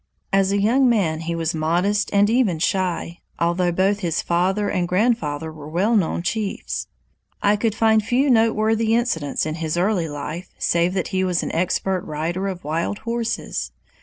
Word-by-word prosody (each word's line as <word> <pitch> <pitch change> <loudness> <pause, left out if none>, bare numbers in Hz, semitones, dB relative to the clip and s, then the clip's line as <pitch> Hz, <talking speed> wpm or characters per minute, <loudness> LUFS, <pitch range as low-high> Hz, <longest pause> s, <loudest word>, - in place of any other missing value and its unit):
As 195 0 +3
a 200 - +1
young 245 +6 +3
man 180 -9 +1
he 165 +1 -3
was 165 0 -1
modest 175 +6 +1
and 200 0 +4
even 225 -6 +2
shy, 175 0 -1 0.2
although 175 +1 +1
both 195 +4 +1
his 170 -5 -1
father 190 +4 +1
and 180 -3 0
grandfather 175 -7 0
were 150 -2 -10
well 195 +8 +1
known 175 -4 +1
chiefs. 210 +1 -3 0.6
I 205 +1 +4
could 215 0 -1
find 220 -1 +3
few 250 +6 +1
noteworthy 225 -1 +2
incidents 170 - 0
in 155 - -2
his 160 +1 -1
early 180 -3 +1
life, 155 +5 -6
save 170 +2 +1
that 185 - -1
he 190 -1 0
was 180 -2 0
an - - -3
expert 185 +2 0
rider 165 +5 -3
of 185 -2 -5
wild 165 +6 -2
horses. 230 0 -2
185 Hz, 170 wpm, -22 LUFS, 170-215 Hz, 0.6 s, and